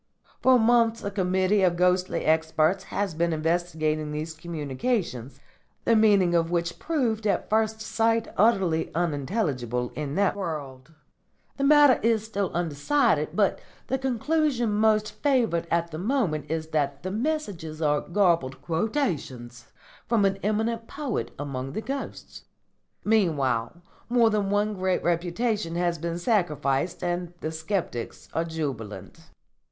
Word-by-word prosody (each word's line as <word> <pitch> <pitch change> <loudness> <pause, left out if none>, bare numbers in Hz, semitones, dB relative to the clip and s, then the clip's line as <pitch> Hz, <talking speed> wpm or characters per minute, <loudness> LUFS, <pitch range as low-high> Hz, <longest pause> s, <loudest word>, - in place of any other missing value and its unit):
For 260 -1 +6
months 230 0 +3
a 200 - -3
committee 190 +1 +1
of 180 -2 +3
ghostly 180 +1 +1
experts 160 +4 +2
has 195 -2 -2
been 170 +2 0
investigating 155 -1 -1
these 155 +2 -4
communications, 150 - -3 0.5
the 230 - +4
meaning 200 -5 +4
of 165 -1 +2
which 170 0 -2
proved 235 -9 -1
at 200 - -1
first 220 0 +1
sight 225 +1 +1
utterly 190 -6 +2
unintelligible 140 - -1
in 150 -1 -4
that 200 -1 +2
world. 155 -6 -6 0.6
The 275 - 0
matter 290 -2 +6
is 225 -1 +2
still 200 -4 -2
undecided; 175 - +1
but - - +2 0.3
the 265 - -1
conclusion 265 -1 0
most 215 0 +2
favoured 235 - +1
at 170 0 0
the 155 - -5
moment 180 - -1
is 160 0 -3
that 140 -2 -1
the 185 - -3
messages 205 - -3
are 150 -2 +2
garbled 170 -9 +1
quotations 150 - -2 0.4
from 220 -3 +3
an 195 0 +1
eminent 225 +2 -1
poet 280 -6 -3
among 135 -2 -5
the - - -2
ghosts. 275 +3 -6 0.6
Meanwhile 170 - +1 0.3
more 235 -2 +4
than 205 -2 0
one 205 +1 +1
great 185 -1 -1
reputation 175 +2 -1
has 175 -1 0
been 170 +1 -3
sacrificed 170 - 0
and 175 0 -2
the 155 - -3
sceptics 160 - -4
are 165 - +1
jubilant." 140 -10 -6
175 Hz, 135 wpm, -26 LUFS, 155-220 Hz, 0.6 s, For